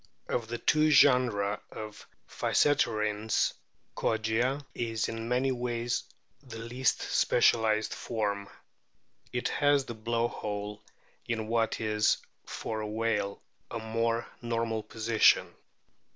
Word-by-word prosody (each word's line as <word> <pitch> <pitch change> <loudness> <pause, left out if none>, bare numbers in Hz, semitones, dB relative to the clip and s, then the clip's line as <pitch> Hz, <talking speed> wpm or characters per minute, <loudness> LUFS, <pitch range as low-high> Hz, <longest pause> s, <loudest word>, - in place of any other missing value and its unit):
Of 115 -2 -1
the 120 +1 -3
two 155 +5 +3
genera 120 -8 +4
of 110 -1 -8 0.2
Physeterines, 110 -6 +1 0.4
Kogia 115 +6 0
is 115 -2 -1
in 115 0 -5
many 130 +2 +2
ways 120 -1 -2 0.4
the 125 -5 -10
least 120 +3 0
specialised 110 -2 +3
form. 100 -3 -2 0.8
It 125 -1 -1
has 145 -2 +3
the 120 - -6
blow 115 +1 0
hole 105 -2 -5 0.5
in 110 -2 -2
what 115 0 0
is 105 -1 +2 0.3
(for 110 -1 -4
a 105 - -3
whale) 105 -2 -1 0.3
a - - -4
more 115 +1 -1 0.2
normal 115 -2 -1
position. 110 +1 +3
115 Hz, 110 wpm, -30 LUFS, 110-120 Hz, 0.8 s, genera